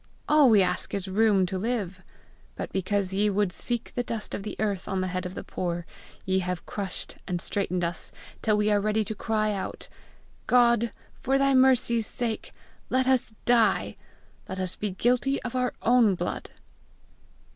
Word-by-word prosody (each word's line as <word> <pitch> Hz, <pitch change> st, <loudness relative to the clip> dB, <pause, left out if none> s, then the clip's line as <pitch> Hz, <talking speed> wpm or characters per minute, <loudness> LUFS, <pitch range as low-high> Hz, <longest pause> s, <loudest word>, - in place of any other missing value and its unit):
All 300 Hz, -3 st, +6 dB
we 210 Hz, -4 st, +6 dB
ask 180 Hz, +2 st, -1 dB
is 195 Hz, -1 st, -3 dB
room 200 Hz, -1 st, +3 dB
to 185 Hz, +1 st, -3 dB
live! 200 Hz, -4 st, -2 dB, 0.5 s
But -, -, -5 dB
because 190 Hz, 0 st, -1 dB
ye 205 Hz, +2 st, +2 dB
would 205 Hz, -2 st, +1 dB
see 240 Hz, +6 st, -2 dB
the 245 Hz, -, 0 dB
dust 230 Hz, -3 st, -4 dB
of -, -, -3 dB
the 210 Hz, -, -6 dB
earth 200 Hz, -4 st, -1 dB
on 190 Hz, -1 st, -1 dB
the 185 Hz, -, 0 dB
head 185 Hz, 0 st, -2 dB
of 180 Hz, -, -9 dB
the -, -, -5 dB
poor, 175 Hz, -1 st, -3 dB, 0.4 s
ye 190 Hz, 0 st, +2 dB
have 180 Hz, -1 st, -3 dB
crushed 195 Hz, -3 st, -6 dB
and 180 Hz, -2 st, -1 dB
straitened 185 Hz, -1 st, -1 dB
us 170 Hz, -1 st, -2 dB, 0.3 s
till 215 Hz, -2 st, +2 dB
we 210 Hz, 0 st, +2 dB
are 205 Hz, -1 st, +3 dB
ready 215 Hz, +1 st, +1 dB
to 220 Hz, -, -3 dB
cry 215 Hz, 0 st, 0 dB
out, 195 Hz, -, -5 dB, 0.6 s
'God, 235 Hz, -2 st, +4 dB, 0.2 s
for 270 Hz, +2 st, 0 dB
thy 275 Hz, 0 st, +3 dB
mercy's 250 Hz, -4 st, +4 dB
sake, 230 Hz, -3 st, -3 dB, 0.4 s
let 260 Hz, 0 st, +2 dB
us 255 Hz, -4 st, +2 dB
die, 240 Hz, -2 st, +3 dB, 0.5 s
lest 185 Hz, -1 st, -4 dB
we 210 Hz, -, 0 dB
be 185 Hz, -, -8 dB
guilty 250 Hz, +5 st, +2 dB
of 240 Hz, -, -5 dB
our 250 Hz, -1 st, +1 dB
own 235 Hz, -4 st, +5 dB
blood!'" -, -, -4 dB
210 Hz, 180 wpm, -27 LUFS, 190-235 Hz, 0.6 s, All